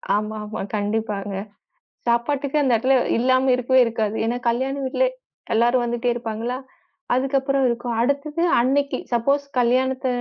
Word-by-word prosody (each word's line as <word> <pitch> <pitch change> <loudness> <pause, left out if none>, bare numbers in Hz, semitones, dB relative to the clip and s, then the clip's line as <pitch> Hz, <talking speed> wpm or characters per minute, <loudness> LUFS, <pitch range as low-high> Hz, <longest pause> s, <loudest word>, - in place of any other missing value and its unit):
ஆமாமா. 215 0 -4
கண்டிப்பாங்க. 205 -1 -2 0.7
சாப்பாட்டுக்கு 275 +5 0
அந்த 260 -3 +2
இடத்துல 260 +4 +3 0.2
இல்லாம 255 +2 +3
இருக்கவே 255 +1 +2
இருக்காது. 220 -2 -1
ஏன்னா, 235 +2 -1
கல்யாண 260 +3 -1
வீட்டுல 265 - +1 0.5
எல்லாரும் 240 +2 +3
வந்துட்டே 240 +1 -1
இருப்பாங்களா. 235 +1 -4 0.6
அதுக்கு 270 +2 +1
அப்புறம் 275 0 0
இருக்கும். 240 0 -2
அடுத்தது 285 +5 -1 0.2
அன்னைக்கு, 275 +3 +1 0.2
சப்போஸ் 275 +5 +2 0.2
கல்யாணத்த 260 +2 +1
245 Hz, 125 wpm, -22 LUFS, 230-265 Hz, 0.7 s, இடத்துல